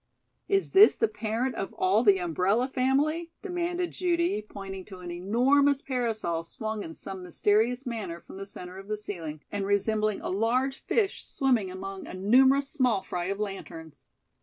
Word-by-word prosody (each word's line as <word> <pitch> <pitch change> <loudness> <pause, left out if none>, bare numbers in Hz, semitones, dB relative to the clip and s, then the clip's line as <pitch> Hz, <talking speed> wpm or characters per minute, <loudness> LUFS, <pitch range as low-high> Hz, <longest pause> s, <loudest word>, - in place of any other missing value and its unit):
"Is 395 -1 +1
this 400 +3 +8
the 450 - +2
parent 230 - -2
of 195 - -4
all 195 +5 +2
the 200 -4 +6
umbrella 185 - +1
family?" 280 +6 +1
demanded 355 -2 -2
Judy, 345 - 0
pointing 195 -2 -8
to 190 - -10
an 180 -1 -7
enormous 260 +10 +3
parasol 220 -10 -1
swung 215 +5 -4
in 165 -4 -7
some 190 -1 -6
mysterious 215 +8 +1
manner 220 -8 -4
from 190 - -12
the 195 0 -7
centre 185 -1 -8
of 195 - -11
the 215 0 -2
ceiling 165 -8 -6
and 205 -1 -2
resembling 210 +1 +1
a - - -4
large 245 +7 +1
fish 410 -4 0
swimming 245 -8 +1
among 195 +1 -7
a - - -7
numerous 260 +8 +4
small 250 -9 +1
fry 175 -2 -3
of 195 +2 -3
lanterns. 165 -6 -7
215 Hz, 165 wpm, -28 LUFS, 190-265 Hz, -, this